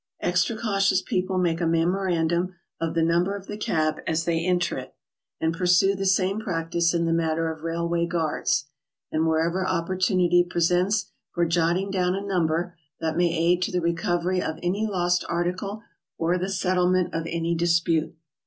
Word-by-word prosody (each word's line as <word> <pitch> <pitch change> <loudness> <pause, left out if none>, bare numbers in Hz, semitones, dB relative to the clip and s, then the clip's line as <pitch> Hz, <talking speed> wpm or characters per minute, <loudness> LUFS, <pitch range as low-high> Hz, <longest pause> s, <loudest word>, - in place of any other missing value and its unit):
Extra 180 +6 +1
cautious 195 -4 +2
people 185 0 -2
make 175 -2 +1
a 170 - +1
memorandum 175 +1 +1 0.2
of 165 0 -2
the 165 - +2
number 175 +4 +2
of 195 -1 -9
a - - -4
cab 155 -7 0
as 165 0 0
they 165 -1 0
enter 180 -1 +1
it, - - -11 0.4
and 160 0 0
pursue 180 +2 +3
the 195 0 -2
same 190 +2 +2
practice 170 -3 0
in 170 -1 0
the 165 - +1
matter 165 0 0
of 160 -1 -9
railway 170 +1 -1
guards, 160 -4 0 0.5
and 160 +1 +1
wherever 165 +3 +1
opportunity 180 0 +2
presents 180 +4 +1 0.2
for 170 -1 0
lotting 170 +3 +1
down 180 -1 +1
a 195 +1 -4
number 175 -2 0 0.2
that 160 -1 -2
may 175 0 +2
aid 170 +2 +2
to - - -1
the 180 - 0
recovery 175 +2 0
of 160 -2 -3
any 200 +5 0
lost 180 -3 +1
article 185 +5 -2 0.3
or 170 +2 +1
the 185 +2 -2
settlement 185 -1 +1
of 165 0 -2
any 170 0 -1
dispute. 170 -1 +1
175 Hz, 170 wpm, -25 LUFS, 165-185 Hz, 0.5 s, pursue